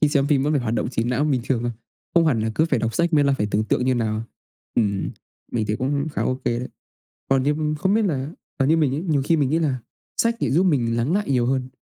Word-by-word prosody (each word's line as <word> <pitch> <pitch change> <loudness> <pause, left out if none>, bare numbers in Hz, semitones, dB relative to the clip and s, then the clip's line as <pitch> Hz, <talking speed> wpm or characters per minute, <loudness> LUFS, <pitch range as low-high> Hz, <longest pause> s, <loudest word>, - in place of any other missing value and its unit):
khi 150 - +4
xem 140 -2 +2
phim 140 -3 +2
vẫn 150 - +1
phải 140 -5 +1
hoạt 115 0 -1
động - - -1
trí 115 -3 -1
não 125 +4 0
bình 135 -4 +1
thường 125 -3 0
thôi, 120 - -1 0.4
không 170 -1 +5
hẳn 125 -8 +2
là 110 +1 -1
cứ 160 - +3
phải 145 -6 +1
đọc 115 0 -2
sách 170 0 +1
mới 145 -2 +4
là 140 - +3
phải 105 - +1
tưởng 105 +2 +1
tượng 125 - 0
như 130 0 +2
nào. 110 -2 -1 0.5
Ừm, 100 -4 0 0.4
mình 110 -3 0
thấy 105 - -1
cũng 140 +4 -1
khá - - -1
OK 130 +1 -2
đấy. 120 +2 -1 0.6
Còn 135 -1 +3
như, 145 - +2
ưm, 150 0 -1
không 190 +7 +1
biết 220 -1 +3
là, 140 -5 -1 0.3
ờ, 135 - +2
như 160 +4 +4
mình 145 -4 +2
ấy, 150 - -2
nhiều 155 -6 +1
khi 165 - +3
mình 140 -3 +1
nghĩ 160 - +2
là 145 -6 0 0.4
sách 230 0 +2
lại - - 0
giúp 165 +7 +3
mình 120 -10 +1
lắng 120 +8 0
lại 205 -2 0
nhiều 125 -2 +2
hơn, 130 0 -1
135 Hz, 285 wpm, -23 LUFS, 120-155 Hz, 0.6 s, không